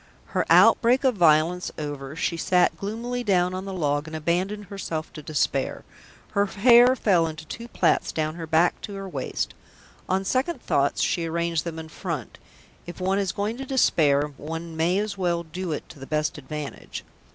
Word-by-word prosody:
Her - - +1
outbreak 250 +3 +6
of 260 -2 +4
violence 170 -1 +3
over, 145 -2 -5
she 165 +1 -1
sat 180 +1 +2
gloomily 235 +4 -4
down 180 -4 +2
on 185 +1 -4
the 195 - -5
log 145 -3 0
and 160 - -7
abandoned 185 +6 -1
herself 175 -5 -5
to 155 - -8
despair. 140 -2 -1 0.5
Her 200 0 +2
hair 240 +5 +6
fell 180 -9 +3
in 160 - -5
two 160 +9 -8
plaits - - +1
down 155 -1 -1
her 165 -1 -7
back 165 +3 +2
to 200 - -7
her 195 0 -6
waist; 185 - -3 0.6
on 190 +1 +1
second 265 - 0
thoughts - - +1
she 170 -2 0
arranged 170 -1 -1
them 165 -1 -5
in 160 0 -7
front 160 - -6 0.5
if 175 - -8
one 190 +2 +1
is 195 -3 0
going 205 +4 -2
to 270 - -5
despair 150 - +3
one 165 +2 -6
may 170 +4 +2
as 205 -1 -2
well 170 -2 0
do 175 +2 -5
it 150 - -4
to 150 - -13
the 135 - -9
best 150 -1 -1
advantage. 150 +1 -7
175 Hz, 185 wpm, -25 LUFS, 155-200 Hz, 0.6 s, outbreak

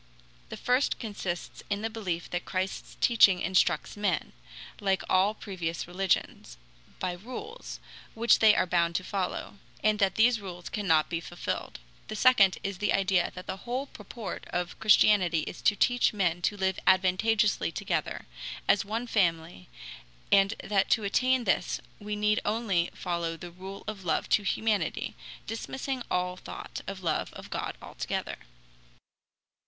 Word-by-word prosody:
The - - -6
first 250 +3 +1
consists 200 -6 -5
in 205 0 -1
the 225 - 0
belief 185 -7 -3
that 175 - -2
Christ's 185 +1 -4
teaching 205 -6 +6
instructs 185 +1 +1
men, 205 -5 -1 0.5
like 195 -1 +1
all 195 +3 +3
previous 175 -6 -4
religions, 180 - -1 0.4
by 185 - -2
rules, 255 - -8 0.4
which 230 +1 +4
they 215 -1 +7
are - - +3
bound 170 -1 +1
to 185 - 0
follow, 195 +1 -3 0.3
and 215 0 +3
that 195 -2 +2
these 230 0 +4
rules 180 -3 -7
cannot 165 -7 +2
be 170 - -2
fulfilled. 175 +1 -4 0.3
The 215 - -5
second 210 -5 +5
is 195 -2 -3
the 210 - +1
idea 190 -2 +2
that 180 0 -8
the - - -4
whole 245 +7 -3
purport 235 -5 -8
of 175 0 -3
Christianity 205 -6 +5
is 165 - -7
to 205 - +4
teach 245 +3 +3
men 175 -4 0
to 205 - 0
live 190 -1 0
advantageously 190 - +3
together, - - -2 0.4
as 200 - +4
one 225 +4 -3
family, 165 - 0 0.6
and 195 +2 +5
that 200 -2 +1
to 220 - -9
attain 255 +5 +2
this 190 -3 +1 0.2
we 210 0 -4
need 210 +1 +2
only 205 -5 +1
follow 170 -2 -2
the 175 +1 -9
rule 190 +3 -9
of 205 -3 -5
love 165 -3 0
to - - +4
humanity, 210 +1 0 0.3
dismissing 260 +3 -4
all 180 0 -1
thought - - -8
of 195 -1 -6
love 165 - -1
of - - -11
God - - -3
altogether. - - -4
195 Hz, 150 wpm, -29 LUFS, 180-215 Hz, 0.6 s, they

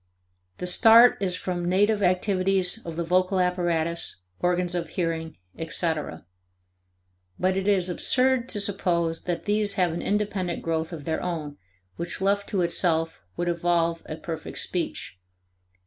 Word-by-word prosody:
The - - -5
start 225 +6 +7
is 185 -2 0
from 175 -1 -3
native 205 +3 +2
activities 185 +2 +2
of 165 - -5
the 170 - -2
vocal 185 +2 +1
apparatus, 170 - 0 0.2
organs 180 0 0
of 170 -3 -3
hearing, 165 -2 -3 0.2
etc. 160 - -2 1.1
But 185 +1 +1
it 195 +1 -2
is 190 -3 +3
absurd 255 +7 +1
to 210 - -2
suppose 175 -5 0
that 175 -1 -3
these 210 -1 +2
have 180 -3 +1
an 170 - -4
independent 200 -4 -2
growth 160 0 -2
of 155 -4 -8
their 160 -1 -2
own, 155 -5 -4 0.4
which 170 0 -3
left 200 +1 0
to 190 -3 0
itself 165 -1 +1 0.2
would 175 - -2
evolve 170 -1 0
a 155 - -5
perfect 160 0 -7
speech. 170 - -4
180 Hz, 145 wpm, -25 LUFS, 165-195 Hz, 1.1 s, start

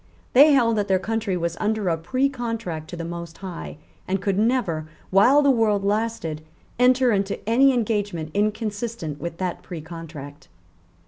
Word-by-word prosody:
They 290 +4 +8
held 230 -4 +3
that 205 - -1
their 190 - +3
country 210 -1 -2
was 170 -1 -2
under 215 -2 0
a 165 - +2
precontract 230 - -2
to 175 - -7
the 170 -1 -5
Most 170 0 -7
High, 185 -5 -7 0.3
and 195 +1 0
could 195 0 0
never, 205 -10 0 0.2
while 250 +10 +5
the 280 - +5
world 215 -5 +2
lasted, 205 -7 -1 0.4
enter 250 0 +4
into 200 0 -2
any 265 +5 +5
engagement 205 -9 -1
inconsistent 210 -5 -2
with 170 -1 -5
that 180 -1 -3
precontract. 160 -4 -9
200 Hz, 150 wpm, -23 LUFS, 170-230 Hz, 0.4 s, They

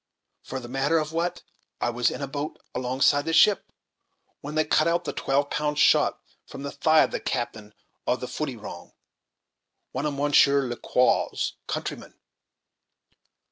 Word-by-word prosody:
For 130 - -6
the 120 - -9
matter 135 +6 +1
of 155 -1 -1
that, 175 +2 -2 0.4
I 120 - 0
was 120 +1 +1
in - - -5
a - - -2
boat, 145 +2 -5 0.2
alongside 130 +3 +2
the 165 - -1
ship, 200 +4 +4 0.7
when 150 +2 -7
they 155 0 +2
cut 155 +1 +3
out 170 +1 +1
the 155 - -4
twelve 140 +1 0
pound 150 0 -1
shot - - +4 0.3
from 135 - -9
the 140 - -4
thigh 155 +2 +4
of - - -2
the - - -2
captain 110 -4 -4 0.3
of - - +1
the - - -4
Foodyrong, - - -6 1.0
one 150 - -2
of 145 - -3
Mounsheer 140 -1 +4
Ler 120 0 -4
Quaw's 125 0 +1
countrymen!" - - -5
145 Hz, 160 wpm, -26 LUFS, 130-155 Hz, 1.0 s, ship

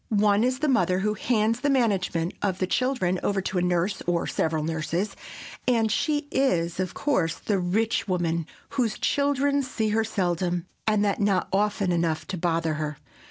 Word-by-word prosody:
One 210 0 +3
is 255 +1 +1
the 305 +3 -1
mother 185 - +2
who 210 +1 +1
hands 225 +1 +1
the 285 - 0
management 195 -10 +1
of 195 -3 0
the 185 - 0
children 185 -5 0
over 200 -1 0
to 190 -1 -1
a - - 0
nurse 180 +2 0
or 175 -1 +1
several 160 -1 -1
nurses, 165 +5 -2 0.5
and 225 -3 +3
she 295 -1 0
is, 175 -11 +1
of 185 -1 -2
course, 185 - +1
the 205 -3 -1
rich 210 +7 0
woman 170 -3 0 0.2
whose 235 -5 -1
children 285 0 +1
see 230 -5 -2
her 220 +1 +2
seldom, 180 -4 -1 0.2
and 210 -1 +3
that 200 +1 0
not 200 -3 +1
often 205 -1 +1
enough 165 -2 0
to 190 - -3
bother 165 -2 0
her. 150 -1 -3
195 Hz, 175 wpm, -26 LUFS, 175-225 Hz, 0.5 s, One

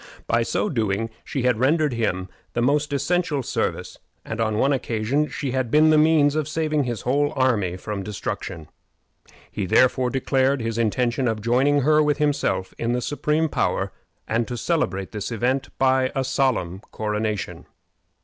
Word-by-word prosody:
By 115 +1 +2
so 115 - 0
doing 115 - -1
she 135 -4 -3
had 125 -3 +2
rendered 150 +2 +2
him 95 -6 -1 0.3
the 120 - 0
most 145 +3 +1
essential 145 0 0
service, - - -3 0.3
and 110 0 -4
on 110 -1 0
one 140 +5 +3
occasion 130 +3 0
she 140 -3 -3
had 130 -2 -1
been 155 +4 +5
the - - +5
means 150 -2 +4
of 155 -2 0
saving 155 -2 0
his 120 -3 -3
whole 145 +4 +1
army 110 -9 +1
from 105 +1 -5
destruction. 95 -5 -5 0.8
He 95 - -3
therefore 130 +4 +3
declared 135 +1 +1
his 115 0 -2
intention 120 +3 +1
of 110 -2 -1
joining 130 +6 +2
her 155 +3 +4
with 150 -1 +2
himself 145 -10 0
in 115 +1 0
the 125 - 0
supreme 150 +4 0
power, - - -1 0.4
and 115 +1 0
to 120 - -4
celebrate 110 - -1
this 105 +1 -5
event 130 +4 0
by 130 -1 +2
a 135 - +1
solemn 125 -9 0
coronation. 105 -1 -3
130 Hz, 165 wpm, -23 LUFS, 110-145 Hz, 0.8 s, been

